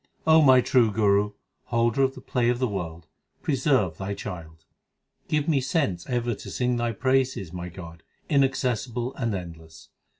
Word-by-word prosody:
O 160 0 +6
my 130 -3 +7
True 120 -3 +3
Guru, 105 -1 +2 0.3
Holder 120 +2 +1
of 135 0 +2
the 130 - -10
play 125 -3 0
of 120 - +1
the 130 0 0
world, 85 -5 -5 0.4
preserve 130 - +1
Thy 100 +1 -3
child. 80 -4 -8 0.6
Give 150 -1 0
me 145 -5 +2
sense 125 - -1
ever 120 -1 0
to - - -9
sing 125 -1 0
Thy 120 0 0
praises, 130 -6 0
my 90 0 -5
God, 85 -2 -10 0.3
in 140 -2 +4
accessible 125 -1 -1
and 115 -5 -2
endless. 80 -3 -10
120 Hz, 165 wpm, -25 LUFS, 90-130 Hz, 0.6 s, my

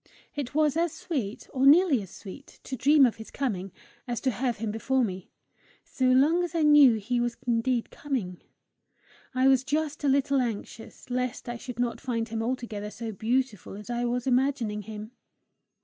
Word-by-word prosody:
It 285 -2 -5
was 305 -2 +3
as 335 -1 +1
sweet, 265 - -4
or 270 0 +3
nearly 305 - +6
as 190 - -9
sweet, 210 +10 -12
to 265 - -5
dream 280 +3 +5
of 240 - 0
his 220 - -10
coming, 195 -9 -3 0.4
as 240 -2 -2
to 260 - +1
have 245 +1 -2
him 215 0 -3
before 255 +4 0
me 185 -4 -4 0.5
so 260 - -2
long 280 +8 +4
as 345 -1 -4
I 325 - +2
knew 295 -5 +7
he 235 +3 -1
was 240 -1 -1
indeed 235 0 0
coming. 225 -12 -4 0.9
I 260 +1 +4
was 265 -1 +4
just 300 +2 -2
a - - +2
little 275 0 +2
anxious 230 +1 -6
lest 250 -1 -2
I 240 0 -4
should 245 0 -8
not 245 -1 -1
find 230 -2 -2
him 225 0 -3
altogether 225 -4 -3
so 225 +1 -6
beautiful 225 0 -2
as 210 +3 -8
I 240 0 -1
was 245 0 -1
imagining 250 -5 +1
him. 215 +2 -8
245 Hz, 180 wpm, -27 LUFS, 225-275 Hz, 0.9 s, knew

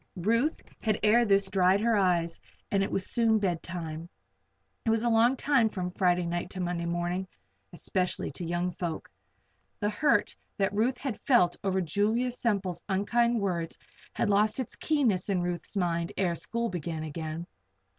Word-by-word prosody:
Ruth 230 - +1 0.2
had 215 -2 0
ere 230 +3 +5
this 200 -2 +3
dried 190 0 +3
her 230 0 +3
eyes 175 -4 +1 0.3
and 195 - +2
it 195 - 0
was 190 - -1
soon 225 -2 +4
bedtime. 170 -4 -3 0.7
It - - 0
is 225 0 +2
a 240 - +2
long 235 +3 +4
time 265 -6 +3
from 180 -3 -4
Friday 180 -1 +2
night 175 +1 -2
to 190 - -6
Monday 175 -1 -2
morning 175 +2 -2 0.4
especially 180 -1 -2
to 160 - -6
young 175 +1 -1
folk. 170 -3 -5 0.7
The 210 0 0
hurt 295 +8 +2 0.2
that 200 +1 +1
Ruth 235 +5 +1
had 260 -6 -4
felt 180 -10 +4
over 190 -1 +1
Julia 210 +8 +1
Semple's 200 -8 -1
unkind 235 +5 +2
words 170 -4 -2 0.4
had 210 - 0
lost 210 +4 +2
its 255 - -4
keenness 240 - +1
in 185 -3 +1
Ruth's 175 +3 -4
mind 170 -1 0
ere 180 -3 +1
school 235 +8 -2
began 165 -2 -4
again. 160 +2 -5
190 Hz, 165 wpm, -29 LUFS, 175-225 Hz, 0.7 s, ere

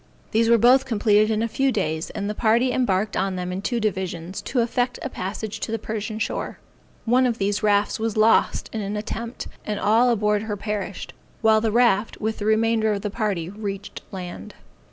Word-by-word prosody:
These 225 +1 +3
were 235 - +6
both 255 +4 +5
completed 215 -2 +3
in 220 0 +1
a - - +1
few 270 +4 +1
days, 160 -7 -2
and 200 - -4
the 210 - -2
party 235 +4 +2
embarked 210 -5 0
on 190 0 0
them 180 0 -3
in 185 +1 -3
two 240 +3 -1
divisions, 190 -4 -3
to 250 - 0
effect 245 +1 0
a 270 - -4
passage 215 +3 -5
to 220 - -4
the 225 - 0
Persian 215 0 -4
shore. 220 - -3 0.5
One 250 +2 +4
of 235 -2 -1
these 205 0 0
rafts 205 -1 +2
was 225 -1 -2
lost 220 +1 +3
in 220 - -2
the - - -2
attempt, 230 +3 -5 0.2
and 210 -1 -3
all 230 +4 +4
on 235 - +2
board 210 0 +1
her 210 -1 -4
perished; 205 -2 -4 0.3
while 220 -1 +4
the 220 -1 +1
raft, 230 -2 +2
with 220 +1 -2
the 205 - -3
remainder 220 0 +2
of 200 0 -4
the 210 - -2
party 200 -6 -1
reached 200 -1 -6
land. 185 +2 -7
215 Hz, 205 wpm, -23 LUFS, 200-230 Hz, 0.5 s, were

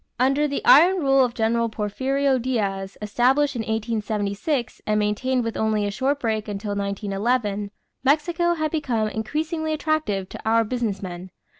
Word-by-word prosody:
Under 275 +4 +3
the 280 - -4
iron 350 +7 +7
rule 270 -5 +4
of 245 -1 -1
General 230 +1 +1
Porfirio 260 +6 0
Diaz, 200 -6 -2
established 260 +7 +2
in - - -3
1876 220 +3 -2
and 215 0 +2
maintained 245 +5 0
with 230 -1 -3
only 215 -1 0
a 205 - -1
short 270 +6 0
break 220 -4 -1
until 205 0 -4
1911, 200 +1 -1 0.3
Mexico 335 +5 +2
had 310 -2 -1
become 240 -9 0
increasingly 315 - -2
attractive 305 - -1
to - - -8
our 225 +1 +3
business 220 -4 -2
men. 180 0 -7
230 Hz, 150 wpm, -23 LUFS, 210-275 Hz, 0.3 s, iron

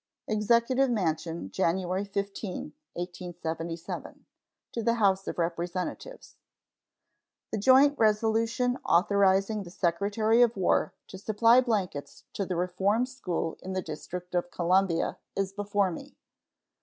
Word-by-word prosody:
EXECUTIVE 235 +5 +2
MANSION, 165 - -2
January 185 - 0
15, 200 -1 -4 0.2
1877. 170 -2 -6 0.5
To 230 - -3
the 230 +1 +2
House 195 -4 +2
of - - -4
Representatives: 175 - -4 1.1
The 215 - -1
joint 270 +6 +5
resolution 225 +3 +2
authorizing 195 +3 +3
the 180 - -9
Secretary 205 +6 +1
of 235 -3 +4
War 190 - +1
to 190 - -10
supply 230 +4 +4
blankets 190 - -3
to 195 - -2
the 185 - -2
Reform 190 +6 +1
School 220 -11 -4
in 190 - -5
the 185 - -1
District 175 +3 -7
of 175 0 0
Columbia 175 0 +1 0.2
is 195 -1 -1
before 205 -1 0
me. 275 +11 -9
195 Hz, 120 wpm, -28 LUFS, 175-225 Hz, 1.1 s, joint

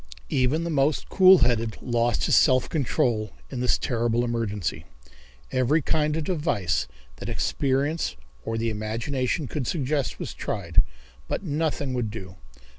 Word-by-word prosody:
Even 135 +5 +2
the 170 - -2
most 145 0 +1
cool 190 0 +7
headed 115 -3 0
lost 120 -1 0
his - - +3
self 130 -1 +4
control 120 - 0 0.2
in 130 - -4
this 125 0 +2
terrible 120 -1 0
emergency. 110 -6 -2 0.7
Every 130 +5 +2
kind 150 +1 +1
of 160 - -1
device 105 - 0 0.3
that - - -6
experience 140 +4 0 0.3
or 115 - -2
the 115 0 0
imagination 115 +7 -2
could 140 -3 -3
suggest 145 -3 -1
was - - -5
tried, - - 0 0.5
but - - -3
nothing 150 -4 -1
would 120 -4 -1
do. 95 -4 -8
130 Hz, 140 wpm, -25 LUFS, 115-150 Hz, 0.7 s, cool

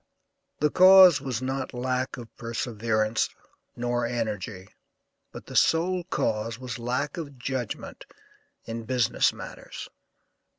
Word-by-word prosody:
The 150 -1 +3
cause 185 -4 +8
was 130 -2 -3
not 130 -1 -3
lack 130 +1 -2
of 120 -2 -11
perseverance 110 -2 -1 0.5
nor 120 0 -1
energy, 110 -5 -3 0.6
but - - -10
the - - -10
sole 175 +2 +3
cause 115 -9 -1
was 125 -2 -6
lack 125 +8 -2
of 145 -5 -7
judgment 125 -2 -5 0.6
in 115 0 -5
business 125 -2 +2
matters. - - -9
125 Hz, 115 wpm, -26 LUFS, 115-135 Hz, 0.6 s, cause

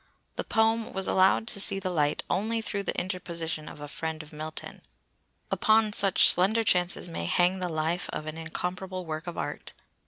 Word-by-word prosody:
The - - -3
poem 225 0 +1
was 190 0 -1
allowed 190 +3 +3
to 200 - +3
see 195 - +4
the 185 -1 -2
light 150 -4 0
only 220 +5 0
through 210 -2 -3
the - - -2
interposition 170 -4 -4
of - - -12
a 145 - -7
friend 160 +1 -5
of 150 - -16
Milton. 155 +1 -7 0.7
Upon 215 -1 +3
such 195 -3 +5
slender 205 +6 +4
chances 180 -3 +1
may 165 - -4
hang 180 - +2
the 180 -1 -2
life 160 +2 -2
of 155 - -5
an 155 0 -5
incomparable 180 +3 -5
work 160 +1 -5
of 175 - -6
art! - - -5
180 Hz, 185 wpm, -28 LUFS, 160-195 Hz, 0.7 s, such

